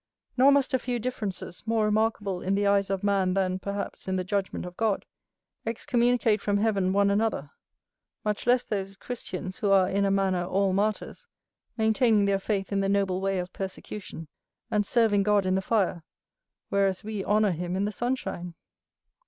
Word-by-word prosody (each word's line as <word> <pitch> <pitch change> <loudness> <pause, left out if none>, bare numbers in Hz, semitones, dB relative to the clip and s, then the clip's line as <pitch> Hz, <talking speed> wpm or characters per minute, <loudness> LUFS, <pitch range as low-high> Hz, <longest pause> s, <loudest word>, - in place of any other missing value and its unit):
Nor 265 +2 +6
must 280 -2 +2
a 260 - +3
few 245 0 -2
differences, 215 -7 -5
more 225 -1 +2
remarkable 210 -3 0
in 190 +1 0
the 205 +1 +1
eyes 200 0 +3
of 195 -1 -2
man 195 -2 +2
than, 185 -1 0
perhaps, 200 0 -5
in 190 - 0
the 185 - -1
judgment 195 0 -2
of 180 0 -8
God, 220 -2 0 0.6
excommunicate 235 -1 +1
from 205 -1 +1
heaven 200 -3 +1
one 200 +1 +3
another; 200 -9 0 0.7
much 210 +2 -2
less 245 0 +4
those 195 -2 -4
Christians 185 -6 -6
who 205 - 0
are 195 -2 +5
in 200 +1 0
a 200 - +2
manner 190 -2 +1
all 190 +1 +1
martyrs, 215 - -2 0.5
maintaining 220 -1 +3
their 200 -1 +2
faith 195 -1 -2
in 200 - +1
the 195 0 0
noble 195 -2 +1
way 195 0 0
of 180 0 -4
persecution, 190 -3 -7 0.4
and 210 -1 +1
serving 225 -4 +3
God 205 -1 +2
in 185 - +1
the 190 - +1
fire, 190 -5 0 0.7
whereas 195 -2 +1
we 210 -2 -4
honour 210 0 +3
him 175 +1 -3
in 195 +2 0
the 210 - -1
sunshine. 205 -7 -3
200 Hz, 175 wpm, -27 LUFS, 190-215 Hz, 0.7 s, Nor